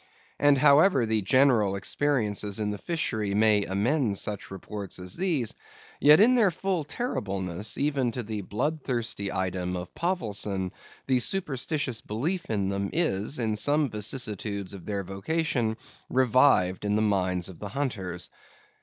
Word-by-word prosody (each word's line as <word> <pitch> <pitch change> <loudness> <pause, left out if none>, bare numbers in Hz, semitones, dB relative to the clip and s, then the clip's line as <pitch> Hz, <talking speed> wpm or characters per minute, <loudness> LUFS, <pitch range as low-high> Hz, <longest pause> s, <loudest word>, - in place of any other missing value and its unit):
And 145 -1 +5
however 140 0 +5
the 110 -1 +1
general 115 -3 +3
experiences 105 -2 -1
in 105 -1 -1
the 105 - -5
fishery 110 - -2
may 105 -1 +4
amend 105 +2 0
such 100 -1 -4
reports 95 +1 -6
as 90 0 -6
these; 165 - 0 0.5
yet 150 +3 +7
in 230 +5 +6
their 230 -6 +4
full 185 -1 -1
terribleness, 100 - -3
even 140 -3 +1
to 125 - -3
the 105 -1 -4
bloodthirsty 120 - -2
item 90 -1 -2
of 90 0 -6
Povelson, 105 - -1 0.3
the 130 -2 +2
superstitious 145 -5 -1
belief 160 - -3
in 100 -3 0
them 100 0 -2
is, 145 - 0
in 110 -3 0
some 145 +4 +1
vicissitudes 105 -3 -3
of 95 -4 -10
their 100 -2 -2
vocation, 110 - -1 0.3
revived 125 -8 +3
in 105 0 0
the 110 - +2
minds 90 -4 +1
of 95 -4 -10
the 105 - -6
hunters. 100 -9 -3
110 Hz, 145 wpm, -27 LUFS, 100-145 Hz, 0.5 s, yet